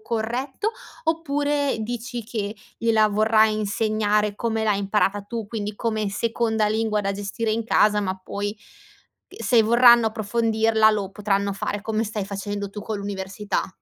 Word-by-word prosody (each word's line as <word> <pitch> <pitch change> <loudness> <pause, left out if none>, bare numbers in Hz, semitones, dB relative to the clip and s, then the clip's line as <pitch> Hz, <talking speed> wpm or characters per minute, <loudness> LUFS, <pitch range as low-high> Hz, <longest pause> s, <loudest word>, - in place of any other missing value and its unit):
corretto, 240 - -2 0.3
oppure 290 -3 0
dici 240 +1 -4
che 210 -2 -4 0.2
gliela 220 -2 +3
vorrai 215 +1 +3
insegnare 210 0 0
come 225 0 -1
l'hai 210 -2 +2
imparata 200 0 +1
tu, 225 0 -5
quindi 210 -1 -4
come 215 -2 -1
seconda 220 0 0
lingua 215 0 0
da 195 0 -1
gestire 205 +3 -3
in 225 +1 -1
casa, 210 -1 +3
ma 190 -2 -2
poi 205 +2 -4
c 210 - -33
uhm, 415 0 -16
se 235 -3 +5
vorranno 235 0 +6
approfondirla 220 0 +2
lo 205 -3 -2
potranno 200 -1 0
fare, 200 +1 -3
come 220 0 -1
stai 210 -2 -3
facendo 200 0 -4
tu 210 - -7
con 215 0 -4
l'università? 200 +1 -3
215 Hz, 150 wpm, -23 LUFS, 205-230 Hz, 0.3 s, vorranno